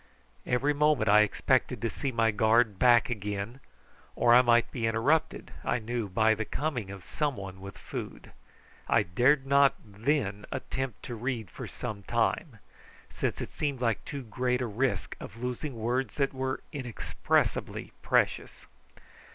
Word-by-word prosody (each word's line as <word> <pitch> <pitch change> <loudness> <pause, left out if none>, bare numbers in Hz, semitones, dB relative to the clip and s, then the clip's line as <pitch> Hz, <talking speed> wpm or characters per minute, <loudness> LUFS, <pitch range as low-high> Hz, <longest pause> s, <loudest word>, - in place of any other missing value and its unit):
Every 135 +4 +2
moment 145 -6 +2
I 105 +1 +7
expected 125 +3 +1
to - - +2
see 135 +4 -3
my 115 -2 +2
guard 110 -1 +3
back 120 -1 +5
again, 105 +2 -4 0.6
or 120 - +4
I 125 - +9
might 120 -1 +3
be 115 -3 -1
interrupted, 120 +8 +1
I - - +1
knew, 115 -2 -3
by 110 +4 +3
the 110 +1 -2
coming 125 -4 -3
of 95 -2 -8
some 145 - -2
one 95 -2 -8
with 100 0 -9
food. - - -7 0.6
I - - +4
dared 130 +10 +3
not 140 0 +5
then 105 -1 -1
attempt 130 -4 -4
to 120 - -6
read 115 -4 -3
for - - -7
some 105 -2 -6
time, 115 - -1 0.5
since - - -2
it - - -6
seemed 140 -3 -2
like 115 -4 0
too 140 -2 -6
great 125 +2 -1
a 125 - -1
risk 120 +4 -1
of 110 - -9
losing 125 +2 -3
words 120 +4 -1
that 140 -1 0
were 130 0 -2
inexpressibly 130 -6 -1
precious. - - 0
120 Hz, 155 wpm, -29 LUFS, 110-130 Hz, 0.6 s, I